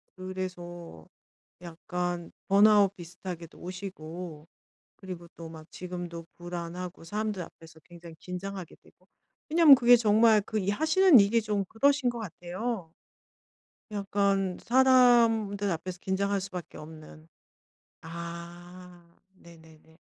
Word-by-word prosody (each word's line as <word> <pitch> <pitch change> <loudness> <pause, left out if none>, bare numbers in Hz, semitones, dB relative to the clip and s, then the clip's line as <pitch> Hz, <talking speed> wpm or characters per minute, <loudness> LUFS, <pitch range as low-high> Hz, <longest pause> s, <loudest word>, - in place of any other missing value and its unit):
그래서 175 - -7 0.6
약간 175 0 -5 0.2
번아웃 200 0 +5
비슷하게도 175 -1 -9
오시고 175 -3 -8 0.5
그리고 180 -3 -9
또 165 -1 -9
막 160 -1 -11
지금도 175 -2 -7
불안하고 175 0 -7
사람들 210 +1 -3
앞에서 165 0 -15
굉장히 170 0 -13
긴장하게 185 -1 -7
되고. - - -25 0.4
왜냐하면 320 -3 +8
그게 245 -1 +6
정말 220 0 +4
그 215 +2 -3
이 195 -1 -2
하시는 315 - +5
일이 210 +3 +3
좀 210 -2 -1
그러신 280 +2 +2
거 240 -1 -5
같아요, 185 0 -5 1.0
약간 195 -2 0
사람들 235 -5 +4
앞에서 180 +2 -4
긴장할 200 +1 -1
수밖에 185 -2 -8
없는. 155 0 -12 0.7
아. 170 +1 -10 0.2
네네네. 160 -2 -18
185 Hz, 255 characters per minute, -28 LUFS, 170-205 Hz, 1.0 s, 왜냐하면